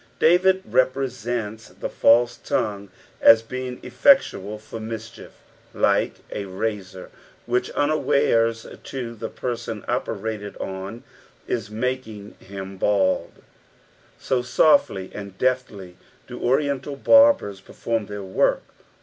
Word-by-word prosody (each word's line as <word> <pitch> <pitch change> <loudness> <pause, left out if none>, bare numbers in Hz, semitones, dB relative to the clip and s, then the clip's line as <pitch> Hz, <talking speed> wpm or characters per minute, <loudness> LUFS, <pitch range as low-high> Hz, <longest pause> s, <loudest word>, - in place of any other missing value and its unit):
David 185 +3 +4
represents 120 -3 -1
the - - -6
false 120 +1 +3
tongue 100 -1 -2 0.3
as 115 0 +7
bein^ 125 +1 -5
effectual 110 - +3
for 110 +1 -9
mischief, 110 0 -8 0.4
like - - +2 0.2
a 100 - -4
razor 95 -1 -5 0.3
which, 125 +1 0
unawares 135 -6 +2 0.2
to 125 -3 -5
the 110 0 -6
person 120 -3 -5
operated 105 -1 -3
on, 95 +5 -6 0.4
is 110 -3 -3
making 110 -2 -4
him 95 0 -8
bald; 95 -1 0 0.7
so 130 -2 0
softly 120 - +2
and 100 -2 -8
deftly 105 -8 -2 0.3
do - - -9
Oriental 140 +1 0
bMbers 280 - +5
perform 115 -3 -3
their 105 -1 -6
work. 95 0 +1
115 Hz, 105 wpm, -23 LUFS, 100-130 Hz, 0.7 s, as